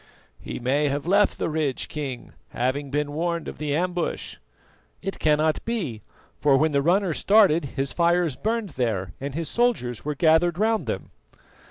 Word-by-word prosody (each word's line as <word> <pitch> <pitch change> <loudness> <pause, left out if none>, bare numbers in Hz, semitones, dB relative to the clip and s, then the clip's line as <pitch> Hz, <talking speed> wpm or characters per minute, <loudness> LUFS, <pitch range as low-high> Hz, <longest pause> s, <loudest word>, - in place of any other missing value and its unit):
"He - - -6
may 140 +4 +1
have 140 +1 -2
left 200 +3 +3
the - - -1
ridge, 155 -4 -1
King, 135 -5 -6 0.2
having 130 +4 -2
been 145 +1 -1
warned 170 +2 -2
of - - -7
the 150 -1 -1
ambush." 175 +1 -2 0.7
"It 195 +1 -4
cannot 155 0 +2
be, 175 - -3 0.4
for 140 -2 +4
when 155 +2 +2
the 140 -1 +2
runner 180 +3 +2
started 195 -7 +4
his 135 0 -2
fires 170 -3 +2
burned 225 - -2
there 110 - -2
and 140 0 -4
his 165 -1 -2
soldiers 175 - 0
were 150 0 -3
gathered 165 +3 +3
round 220 - +1
them." - - -4
155 Hz, 165 wpm, -24 LUFS, 140-175 Hz, 0.7 s, for